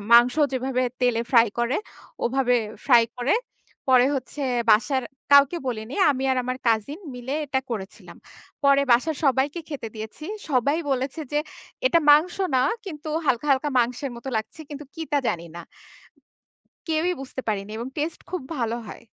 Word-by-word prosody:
মাংস 240 +2 +7 0.2
যেভাবে 255 0 0 0.2
তেলে 245 -2 +2
ফ্রাই 235 -3 +6
করে 240 +4 +1 0.5
ওভাবে 250 0 +2 0.3
ফ্রাই 240 -4 +7
করে। 245 +8 +2 0.5
পরে 255 -1 +6
হচ্ছে 270 +3 -6 0.3
বাসার 255 +5 +3 0.3
কাউকে 280 +4 +7
বলিনি। 235 0 -4 0.2
আমি 265 -1 -2
আর - - 0
আমার 255 +1 -3
কাজিন 230 - +1 0.2
মিলে 250 +3 -4
এটা 265 -1 0
করেছিলাম। 200 -4 -7 0.5
পরে 280 0 +5
বাসার 280 +6 +2
সবাইকে 275 +5 +2
খেতে 280 -7 -5
দিয়েছি। 220 +7 -8 0.2
সবাই 280 +3 +2
বলেছে 265 +4 -1
যে, 295 - +2 0.5
"এটা 335 - +5
মাংস 315 +5 +5 0.2
না, 255 - +4 0.2
কিন্তু 310 -3 -7 0.2
হালকা, 260 +2 +1
হালকা 275 +2 +2
মাংসের 245 +3 0
মতো 235 +3 -8
লাগছে 220 +8 -5
কিন্তু 295 0 -8
কি 325 - -5
তা 290 - +4
জানিনা।" 170 0 -4 1.3
কেউই 325 +3 +1
বুঝতে 265 0 -6
পারেনি 205 -1 -2
এবং 235 +2 -4
টেস্টে 310 +2 -3
খুব 365 - -2 0.2
ভালো 235 -2 -1
হয়। - - -10
260 Hz, 155 wpm, -24 LUFS, 235-290 Hz, 1.3 s, মাংস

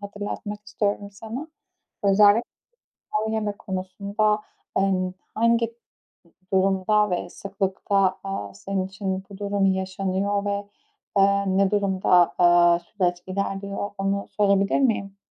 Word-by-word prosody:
hatırlatmak 205 +1 -5
istiyorum 205 -1 -2
sana. 225 +9 -7 0.5
Özellik 205 +3 +5 0.7
ha - - +1
yeme 215 -2 -1
konusunda 200 +2 -1 0.3
an 185 -1 +1 0.2
hangi 230 +1 +3
d - - -17 0.8
durumda 195 +2 +3
ve 175 0 -2
sıklıkta, 195 0 0
aaa, 100 - -5
senin 185 - -3
için 190 -1 -4
bu 195 - -10
durum 200 -1 +1
yaşanıyor 190 +1 0
ve, 200 0 -2 0.5
aaa, 200 0 +4
ne 195 +1 +2
durumda, 190 -3 +3
aaa, 175 -1 +6
süreç 175 -1 -1
ilerliyor, 200 +1 -3
onu 195 0 -1
sorabilir 200 +2 +2
miyim? 205 -6 0
195 Hz, 115 wpm, -24 LUFS, 190-205 Hz, 0.8 s, aaa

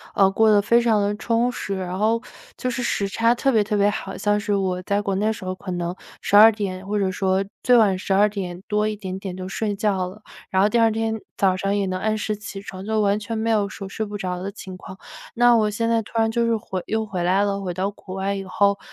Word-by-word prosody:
呃， 195 -1 +5
过 220 +2 +4
得 205 -1 +6
非 235 +4 +3
常 225 -3 +3
得 205 +1 0
充 235 +2 +1
实， 200 -5 -4
然 185 -1 -4
后 225 +2 +2 0.4
就 255 - -2
是 245 +1 -3
时 200 -4 0
差 230 +4 +2
特 270 +3 +1
别 220 -3 +3
特 210 0 -1
别 205 0 +4
好。 195 -2 -5
像 205 0 +1
是 205 0 -1
我 185 -2 -1
在 200 +2 0
国 195 - -1
内 205 +2 0
的 220 - +2
时 190 - -9
候 185 - -2
可 185 0 -7
能 175 0 -3 0.3
12 215 +2 +7
点 195 -3 -4
或 210 - -1
者 195 -2 +1
说 190 +1 0 0.2
最 250 -1 +5
晚 205 -5 +4
12 200 +2 +3
点 185 -4 -5
多 210 0 +1
一 215 - -2
点 190 -2 -6
点 190 -2 -6
就 185 - -5
睡 205 +3 -2
觉 195 -3 0
了， 210 +4 -12 0.3
然 190 +1 +2
后 - - +5
第 235 +2 +2
二 225 -1 +4
天 225 0 -1 0.2
早 190 -2 +3
上 195 +2 -1
也 200 - 0
能 185 0 -2
按 215 +2 0
时 215 0 -2
起 205 -1 -8
床， 190 -2 -8
就 220 +1 0
完 200 0 +2
全 220 +2 -4
没 225 +1 0
有 205 -2 +1
说 195 +1 -7
睡 220 +3 -4
不 205 -1 -5
着 180 -2 -3
的 195 +2 -4
情 190 -3 -9
况。 190 +1 -11 0.4
那 240 0 +5
我 215 -2 +3
现 230 +2 -1
在 230 -1 +2
突 210 - -14
然 225 0 +2
就 235 0 +1
是 230 -1 +2
回 190 -4 -5
又 220 0 -1
回 185 -4 -3
来 190 +3 +3
了， 200 -1 -1
回 185 -2 -3
到 190 +3 -2
国 190 -2 -10
外 195 +1 -1
以 195 -1 -4
后， 200 +1 +2
205 Hz, 280 characters per minute, -23 LUFS, 190-220 Hz, 0.4 s, 12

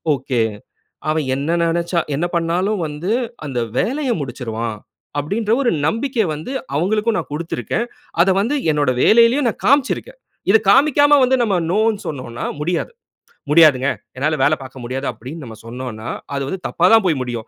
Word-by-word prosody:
Okay. 130 -2 -1 0.7
அவன் 155 -2 0
என்ன 145 +4 -2
நினச்சா 170 +1 0 0.2
என்ன 160 +5 0
பண்ணாலும் 180 +4 0
வந்து 155 +7 -4 0.4
அந்த 130 -3 -2 0.2
வேலைய 265 +2 0
முடிச்சிருவான். 115 -4 -4 0.4
அப்பபிடின்ற 210 +9 -1
ஒரு 245 - +2 0.2
நம்பிக்கை 230 - 0
வந்து 155 - -7 0.2
அவுங்களுக்கும் 215 +7 +1
நான் - - -4
கொடுத்திருக்கிறேன். 160 - -2 0.4
அத 180 - +4
வந்து 240 +8 0 0.2
என்னுடைய 145 -4 +1
வேலையிலேயும் 235 +4 +5
நான் - - -7
காமிச்சு 280 0 +4
இருக்கேன். - - -11 0.3
இத 220 - +7
காண்பிக்காம 290 +4 +5
வந்து 255 +1 +3
நம்ம 205 -4 +1 0.2
நோன்னு 215 +1 +1
சொன்னோன்னா, 130 -5 -5 0.2
முடியாது. 175 - -1 0.6
"முடியாதுங்க, 150 -4 +6 0.3
என்னால 155 +3 0
வேலை 155 - +4
பார்க்க 130 -1 -10
முடியாது" 130 +3 -4
அப்பிடின்னு 130 +8 -9
நம்ம 110 -2 -10
சொன்னோன்னா, 120 -1 -6 0.3
அது 140 - -2
வந்து 190 +7 -4
தப்பா 170 - +1
தான் 225 -3 +5
போய் 160 -7 +1
முடியும். 120 -3 -4
165 Hz, 155 wpm, -19 LUFS, 130-220 Hz, 0.7 s, இத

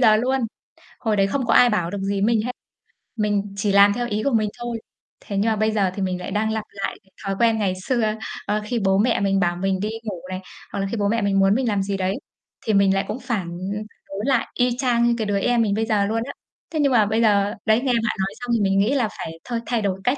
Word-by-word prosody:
giờ 215 -4 +6
luôn. 260 +4 +1 0.6
Hồi 220 -3 0
đấy 195 -1 +3
không 260 +4 -1
có 230 - +2
ai 245 - +7
bảo 180 -6 0
được 205 - -3
gì 195 0 -1
mình 225 +2 +3
với 215 - -1
hết, 250 - -1 0.6
mình 205 -2 -1
chỉ 200 0 +1
làm 200 +1 +6
theo 240 +2 -2
ý 215 -1 -2
của 280 - +1
mình 215 -2 +2
thôi. 240 -1 -3 0.5
Thế 200 - -3
nhưng 215 +3 +2
mà - - +1
bây 215 +1 +1
giờ 195 -4 +1
thì 200 - -3
mình 185 -1 -1
lại 180 - -6
đang 220 +2 0
lặp 220 -1 -2
lại 200 - -4
cái 190 - -30
thói 195 0 -1
quen 230 -1 +4
ngày 190 -3 +1
xưa, 225 -4 +1 0.3
ơ, 210 +1 0
khi 235 +2 -1
bố 195 -2 +2
mẹ 230 +4 +2
mình 195 -1 +2
bảo 175 -2 +1
mình 190 +1 -1
đi 210 - -1
ngủ 195 -6 -5
này, 185 0 -4 0.3
hoặc - - -3
là 195 - -1
khi 230 - -2
bố 205 -1 +1
mẹ 230 +2 +1
mình 200 -1 +2
muốn 195 +1 +4
mình 255 0 0
làm 205 -3 +1
gì 195 0 -2
đấy, 190 +1 0 0.5
thì 220 - +1
mình 195 -1 +4
lại 195 +1 0
cũng 215 +5 -4
phản 235 -9 -2 0.6
đối 195 +2 -4
lại 265 -4 +2
y 245 -1 +1
chang 245 -3 +2
như 240 0 +4
cái 220 - -1
đứa 200 -1 +1
em 240 +3 +2
mình 210 -3 +1
bây 225 +2 0
giờ 210 -3 +2
luôn 225 +2 -1
á. 280 - -6 0.4
Thế 315 - -2
nhưng 280 -2 +3
mà 225 -4 +5
bây 220 +2 +1
giờ 205 -2 +3
đấy 220 +2 +4
nghe 260 -2 +1
bạn 230 -1 +1
nói 190 - +1
xong 245 -1 -4
thì 230 - +2
mình 195 -1 +2
nghĩ 220 +8 +2
là 250 -6 +2
phải 165 0 -6
thôi, 235 -1 -3
thay 235 -2 0
đổi 195 -2 -1
cách, 250 +6 +2
210 Hz, 285 wpm, -23 LUFS, 195-235 Hz, 0.6 s, ai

